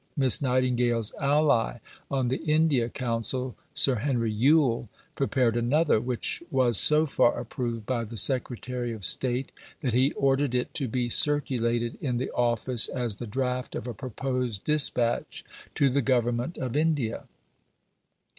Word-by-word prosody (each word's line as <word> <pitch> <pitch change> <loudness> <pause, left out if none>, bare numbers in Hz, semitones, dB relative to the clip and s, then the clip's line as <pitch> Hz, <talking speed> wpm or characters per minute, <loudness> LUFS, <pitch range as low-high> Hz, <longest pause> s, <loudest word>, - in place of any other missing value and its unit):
Miss 135 -1 +5
Nightingale's 125 -4 0
ally 140 -5 +2 0.3
on 130 -3 -1
the 130 - -1
India 150 -6 +1
Council, 125 +1 -3 0.2
Sir 130 -3 +3
Henry 115 -2 -1
Yule, 120 0 +2 0.2
prepared 130 -4 0
another, 125 +2 +2
which 125 0 -3
was 125 -5 +3
so 155 +1 +5
far 130 -4 +1
approved 115 -3 -5
by 120 -1 -2
the 115 +1 -8
Secretary 125 +1 0
of 105 -4 -5
State 130 0 +2 0.3
that 125 -5 -2
he 130 +4 +3
ordered 135 -1 0
it 125 - -2
to 140 -4 -1
be 125 +1 -2
circulated 120 -4 +1
in 125 -4 -2
the 130 - -3
Office 120 0 +1
as 120 -5 -3
the 120 - -7
draft 125 +2 -3
of - - -5
a 120 - -5
proposed 125 -2 -4
dispatch 135 -6 +1 0.3
to 140 - +3
the 140 +2 +1
Government 120 +3 -1
of 130 -1 -4
India. 150 -7 -1
125 Hz, 145 wpm, -26 LUFS, 120-135 Hz, 0.3 s, Miss